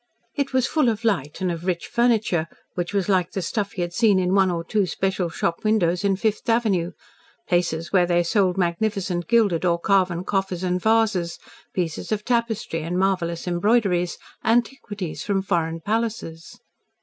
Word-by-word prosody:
It 280 -1 -2
was 260 -1 +2
full 300 -5 +2
of 225 0 -3
light, 175 -11 -1
and 185 -1 +1
of 170 0 -5
rich 175 -2 -1
furniture, 220 -9 +1 0.3
which 175 0 -3
was 200 -3 0
like 185 -3 +1
the 190 - -2
stuff 200 0 -2
he 180 - -2
had 175 0 -5
seen 215 -1 +4
in 185 0 +1
one 195 -1 +4
or 170 -1 -2
two 200 +2 0
special 190 -1 -1
shop 170 0 -2
windows 190 -5 +2
in 200 -1 +2
Fifth 215 +4 -1
Avenue 200 -7 +1 0.5
places 170 -1 0
where 180 -2 +4
they 175 0 +2
sold 185 +1 +1
magnificent 180 -1 -1
gilded 205 -8 +3
or 170 -1 +2
carven 185 -2 +2
coffers 190 -2 -2
and 180 0 0
vases, 220 -6 +2 0.3
pieces 170 0 -3
of 210 -1 -1
tapestry 230 -8 -1
and 170 +3 -3
marvellous 180 -3 0
embroideries, 180 -1 +1 0.3
antiquities 225 - -1
from 195 -2 0
foreign 165 -3 -1
palaces. 210 -5 -3
190 Hz, 170 wpm, -23 LUFS, 175-215 Hz, 0.5 s, seen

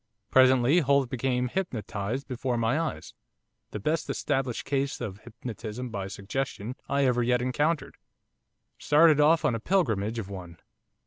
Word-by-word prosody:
Presently 130 +4 +5
Holt 140 -4 +2
became 125 0 0
hypnotised 120 - -3
before 125 -1 -2
my 115 +6 +1
eyes, 165 -1 -4 0.6
the 105 - -5
best 155 +9 -1
established 135 -4 -1
case 140 0 -1
of 105 -5 -5
hypnotism 115 +1 -7
by 100 -3 -4
suggestion 110 +3 -4
I 140 0 +2
ever 125 -1 +2
yet 125 +1 +2
encountered 145 +6 -1 0.8
started 150 0 +5
off 160 +2 +4
on - - +3
a 115 - -2
pilgrimage 115 - 0
of 110 -4 -4
one. 90 -4 -9
125 Hz, 140 wpm, -27 LUFS, 115-140 Hz, 0.8 s, Presently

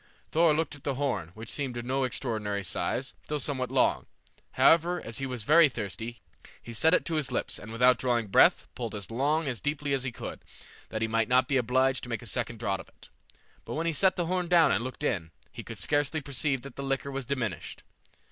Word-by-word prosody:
Thor 160 -1 +4
looked 160 -1 -1
at 145 -1 -12
the 140 -3 -1
horn, 125 - -1
which 110 +1 -8
seemed 135 -4 -2
of 120 - -5
no 130 +1 0
extraordinary 110 -6 -2
size 130 +8 -2
though 150 - -1
somewhat 130 -3 -1
long; 130 0 +2 0.5
however, 170 +2 +4
as 115 +2 -7
he 135 - -2
was 125 -4 -4
very 155 +5 +6
thirsty, 110 +1 -6 0.4
he 120 - -10
set 160 +9 +4
it - - 0
to 160 - 0
his 150 -4 -1
lips, - - -2
and 105 - -9
without 125 +2 +4
drawing 120 -3 +1
breath, 95 - +5
pulled 115 -3 -5
as 100 +1 -5
long 145 +7 +1
and 150 - -3
as 120 - -4
deeply 145 -1 -1
as 135 -2 0
he 125 - -2
could, - - -8 0.5
that 110 0 -2
he - - +1
might 115 0 +1
not 130 +1 +4
be 140 - 0
obliged 130 +1 +2
to 125 - -8
make 115 -2 -3
a - - -10
second 120 +1 -2
draught 100 -4 -1
of 95 - -11
it; - - -19 0.5
but - - -6
when 160 +2 -1
he 165 - +1
set 190 +5 +3
the 175 - -1
horn 180 +1 -1
down 170 -4 +5
and - - +1
looked 130 +3 -6
in, 85 - -1 0.2
he - - -7
could - - -9
scarcely 145 +2 0
perceive 140 -2 -1
that 140 -3 -10
the - - -4
liquor 135 0 -2
was 135 -2 -4
diminished. 115 - -3
130 Hz, 235 wpm, -29 LUFS, 115-145 Hz, 0.5 s, very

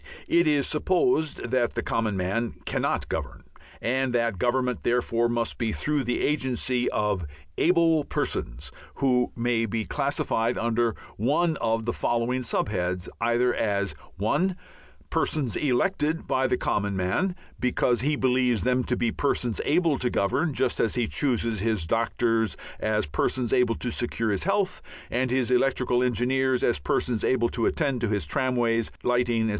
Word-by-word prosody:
It 170 -1 +3
is 145 -3 +3
supposed 160 -5 0
that 125 -2 +1
the - - -1
common 110 -3 -1
man 105 +6 -1
cannot - - -1
govern, - - -5 0.4
and 130 +1 0
that 115 -5 0
government 125 +1 0
therefore 120 -1 +1
must 120 -1 -1
be 115 -3 0
through 145 +3 -1
the 120 - -1
agency 130 -3 0
of 105 -4 0 0.4
Able 165 -3 +4
Persons 60 +5 -3 0.2
who 125 -2 +2
may 115 -1 0
be 110 +1 -2
classified 125 -4 0
under 115 0 +1 0.2
one 155 - +1
of 115 -1 -1
the 120 - -1
following 120 +2 0
sub 115 - 0
heads, 90 -3 -2
either 120 +1 +2
as 100 -2 0 0.2
(1) 175 - +1 0.6
persons 140 -7 0
elected 150 +4 0
by 130 0 +1
the 125 - +1
common 100 -1 -1
man 95 - 0 0.2
because 125 -2 +1
he 150 +3 +1
believes 125 -3 +2
them 125 0 +2
to 125 - 0
be 120 -2 +1
persons 125 -5 -1
able 160 -1 +2
to 125 - +1
govern 140 - 0
just 130 -2 0
as 115 - +1
he 120 -2 +1
chooses 115 -6 0
his 110 -4 0
doctors 115 +1 0 0.2
as 110 0 0
persons 120 - -1
able 120 -2 +3
to 120 - -3
secure 115 -3 -1
health, 190 - 0 0.3
and 125 +1 0
his 125 0 +1
electrical 125 -1 +2
engineers 125 +1 +1
as 120 - +2
persons 110 - -1
able 120 -2 +2
to 115 - 0
attend 140 -6 0
to 120 - +1
his 105 -6 0
tramways, 120 - 0
lighting, 120 -2 +1
etc. 110 - 0
120 Hz, 155 wpm, -26 LUFS, 115-130 Hz, 0.6 s, Able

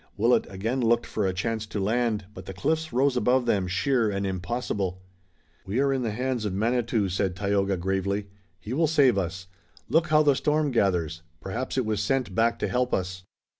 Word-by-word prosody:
Willet 115 +4 +3
again 110 +7 -2
looked 120 0 +2
for 105 -3 -1
a - - +1
chance 110 +3 -2
to 105 -1 -4
land, 110 0 0
but - - -10
the 95 - -7
cliffs 160 +9 -1
rose 135 +2 +2
above 125 +1 +2
them 100 -5 +1
sheer 110 +5 +1
and 100 0 -2
impossible. 95 0 -2 0.6
"We 100 +6 -2
are 140 0 +2
in 135 - -1
the 115 - -1
hands 125 +2 -2
of 100 -3 -2
Manitou," 115 0 +1
said 95 0 -1
Tayoga, 100 -1 0
gravely. 95 +2 -1 0.3
"He 105 +8 -6
will 160 +4 +2
save 140 -8 +4
us. 90 0 -4 0.4
Look, 160 +1 +3
how 155 0 +4
the 145 -2 +5
storm 150 +1 +1
gathers! 85 - 0 0.2
Perhaps 120 +10 -4
it 130 - +1
was 110 -2 -1
sent 120 -1 0
back 115 +3 +2
to - - -1
help 125 0 +1
us." 95 0 -4
110 Hz, 195 wpm, -26 LUFS, 95-125 Hz, 0.6 s, the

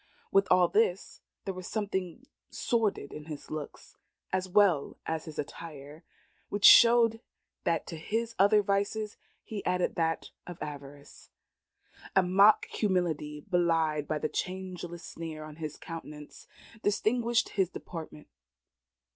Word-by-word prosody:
With 195 0 +4
all 180 -1 +5
this, 195 -1 0 0.2
there 195 - -2
was 185 -1 -8
something 200 +1 -3 0.2
sordid 220 -11 -1
in 150 - -8
his 155 -2 -9
looks 155 -2 -7 0.4
as 185 0 -1
well 185 -7 +3
as 160 -1 -3
his 155 - -9
attire, 150 0 -8 0.5
which 205 0 0
showed 230 -1 +8 0.4
that 165 -1 +1
to 165 - -7
his 225 +8 -2
other 205 +2 +5
vices 205 +2 -1 0.3
he 210 -2 -6
added 180 0 0
that 165 -1 -1 0.2
of 175 -1 -8
avarice. 145 -1 -9 0.9
A 190 - +6
mock 195 +4 +5
humility, 165 -7 -1
belied 165 -4 +1
by 155 - -1
the 155 - -1
changeless 180 -1 -5
sneer 160 -2 -7
upon 155 0 -10
his 155 -2 -6
countenance, 150 -3 -9 0.3
distinguished 230 +3 +1
his 190 -4 0
deportment. 160 -5 -9
180 Hz, 130 wpm, -30 LUFS, 155-200 Hz, 0.9 s, showed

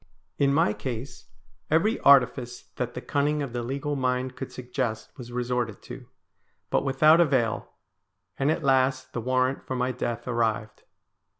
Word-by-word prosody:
In 140 -1 +4
my 140 -7 +3
case 125 +1 -6 0.4
every 185 +9 +2
artifice 125 -3 +4
that 125 -1 -3
the 125 - -4
cunning 145 +2 0
of 130 -4 -6
the 120 - -2
legal 140 +4 -3
mind 130 -1 -1
could 135 -1 -6
suggest 125 -3 -4
was 120 -2 -10
resorted 125 -3 -2
to, 125 0 -10 0.6
but - - +2
without 155 +5 +5
avail, 130 -8 +1 0.7
and 135 +1 +2
at 160 +1 0
last 130 -1 +2
the 120 - -3
warrant 130 +2 0
for 130 - -2
my 125 0 0
death 120 -1 -4
arrived. 115 -3 -1
130 Hz, 155 wpm, -26 LUFS, 120-140 Hz, 0.7 s, without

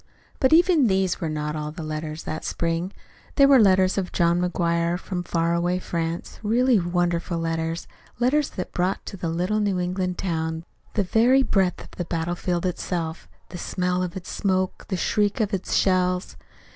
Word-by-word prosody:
But 260 - +3
even 330 -4 +5
these 190 -2 +1
were 165 - -1
not 150 0 -3
all 150 -1 -3
the 160 +1 -7
letters 155 0 -5
that 155 - -5
spring. 170 +2 -2 0.4
There 275 -1 +6
were 275 -2 +7
the 215 - +7
letters 190 0 +3
of 185 - -4
John 170 0 +2
McGuire 170 -1 0
from 180 0 -4
far 170 -1 0
away 175 +1 +1
France 170 -2 -4
really 235 +2 +3
wonderful 175 -1 0
letters 165 0 -2 0.3
letters 270 +5 +2
that 185 - -6
brought 180 +2 -1
to - - -6
the 175 -3 -3
little 180 +6 0
New 200 -3 0
England 180 0 -2
town 160 -2 -2 0.3
the 205 - +2
very 240 +8 +4
breath 190 -6 +1
of - - -15
the 175 - -5
battle 170 0 -2
field 175 0 -2
itself, 170 -2 -3 0.2
the 175 - -7
smell 180 0 -1
of 180 +1 -3
its 185 - -7
smoke, 185 -2 -1
the 190 - -2
shrieks 205 +6 +1
of 210 -1 -1
its 190 - -1
shells. 180 - +1
180 Hz, 185 wpm, -24 LUFS, 170-195 Hz, 0.4 s, were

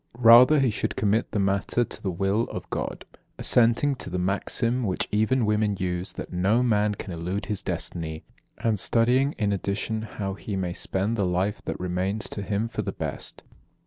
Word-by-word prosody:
Rather 125 +5 +8
he 130 -4 +3
should - - -2
commit 105 +3 +1
the - - -3
matter 100 +4 +1
to - - -8
the 95 - -2
will 95 +5 0
of - - -7
God; - - -4 0.3
assenting 120 +4 +3
to - - -5
the 90 - -3
maxim 105 +6 0
which 95 -6 -1
even 110 +4 +2
women 105 -1 +1
use, 90 0 -2
that - - -7
'no 100 +7 +2
man 105 -3 +2
can 95 -2 -7
elude 90 +5 -3
his 105 -1 -3
destiny,' 80 -2 -4 0.3
and 110 -3 0
studying 125 +7 +3
in 105 -2 -1
addition 100 +3 -2
how 105 -3 -4
he 100 +1 -5
may 90 -2 -2
spend 100 +5 -2
the 100 - +1
life 95 +4 0
that - - -4
remains 90 +4 -2
to 100 - -5
him 100 +3 -1
for 115 - -3
the - - -3
best." - - -5
105 Hz, 185 wpm, -26 LUFS, 95-115 Hz, 0.3 s, Rather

